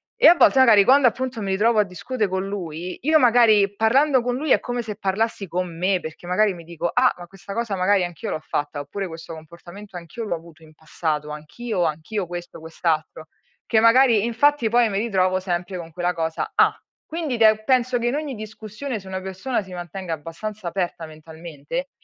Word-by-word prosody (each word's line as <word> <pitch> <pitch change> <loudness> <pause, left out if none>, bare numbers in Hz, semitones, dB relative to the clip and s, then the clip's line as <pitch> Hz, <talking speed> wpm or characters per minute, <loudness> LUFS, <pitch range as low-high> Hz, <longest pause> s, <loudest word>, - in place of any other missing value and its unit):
E, 485 - +6
a 350 - +9
volte, 270 - +5
magari 215 -6 +7
quando, 265 -1 +6
appunto, 245 -1 -2
mi 195 -1 -2
ritrovo 215 +3 +2
a - - +5
discutere 210 +3 -3
con 190 +1 -2
lui 180 -3 -5
io 310 +3 +4
magari 220 -5 +4
parlando 260 +5 +3
con 245 0 -2
lui, 300 0 -2
è - - +6
come 245 -1 -3
se 210 -2 -6
parlassi 200 0 -1
con 175 0 -3
me, 185 +1 +1
perché, 160 +2 -9
magari, 195 +2 +2
mi 170 -1 -11
dico: 170 0 -3
“Ah, 250 0 +4
ma 175 - -9
questa 195 +1 -10
cosa, 230 -4 -2
magari, 185 0 +2
anch'io 175 -4 -6
l'ho - - -2
fatta. 145 -1 -3
Oppure, 190 +7 -5
questo 165 0 -9
comportamento, 175 +5 -11
anch'io 175 +7 -8
l'ho 175 - -1
avuto 165 -1 -14
in 155 0 -17
passato. 155 -1 -3
Anch'io, 175 +6 -4
anch'io, 165 +5 -3
questo, 175 -1 -8
quest'altro”. 160 -1 -2 0.4
Che, 220 - +3
magari, 230 -2 +5
infatti, 235 0 +2
poi, 240 0 +4
mi 195 -1 -1
ritrovo 185 -4 +1
sempre 180 0 -3
con 165 -1 -8
quella 180 +2 -1
cosa: 160 -1 -3
"Ah!". - - +4 0.3
Quindi, 315 -7 -3 0.3
penso 255 -1 +2
che, 240 - -1
in 255 - 0
ogni 295 -4 -3
discussione, 215 +3 -6
se 190 - -14
una 190 0 -4
persona 190 +6 -3
si 185 -1 -12
mantenga 175 0 -5
abbastanza 175 +6 -7
aperta 175 -3 -3
mentalmente, 160 - -7
195 Hz, 195 wpm, -22 LUFS, 170-235 Hz, 0.4 s, a